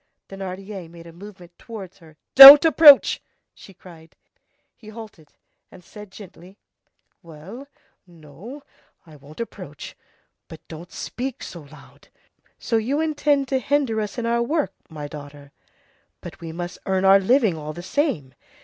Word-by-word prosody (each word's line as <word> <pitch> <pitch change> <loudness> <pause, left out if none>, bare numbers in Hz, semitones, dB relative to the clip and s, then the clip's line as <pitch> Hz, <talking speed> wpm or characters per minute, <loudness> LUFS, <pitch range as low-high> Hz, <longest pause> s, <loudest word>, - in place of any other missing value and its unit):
Thénardier 195 -1 -9
made 170 0 -15
a 165 - -14
movement 180 -1 -16
towards 200 -6 -12
her. 160 -3 -20 0.2
"Don't 280 +3 +11
approach!" 310 -3 +5 0.3
she - - -17
cried. 170 -3 -18 0.6
He 220 - -19
halted, 215 -8 -14 0.4
and 180 - -18
said 210 +3 -14
gently:— 190 -1 -16 0.6
"Well, 180 - -13 0.4
no; 175 - -14 0.4
I 155 -2 -17
won't 145 +1 -17
approach, 185 -10 -10 0.5
but 160 0 -15
don't 170 +2 -12
speak 260 +1 -7
so 170 - -10
loud. 155 - -19 0.5
So 230 - -3
you 255 +7 -3
intend 295 -3 -1
to 265 - -1
hinder 265 -6 -2
us 210 +1 -7
in 240 - -4
our 235 0 -1
work, 295 +5 -3 0.2
my 150 -3 -9
daughter? 145 -1 -13 0.7
But - - -13
we 165 -1 -8
must 175 +2 -8
earn 190 0 -1
our 195 +1 +5
living 220 -2 0
all 155 -1 -8
the 175 - -11
same. 185 - -3
190 Hz, 145 wpm, -21 LUFS, 165-235 Hz, 0.7 s, Don't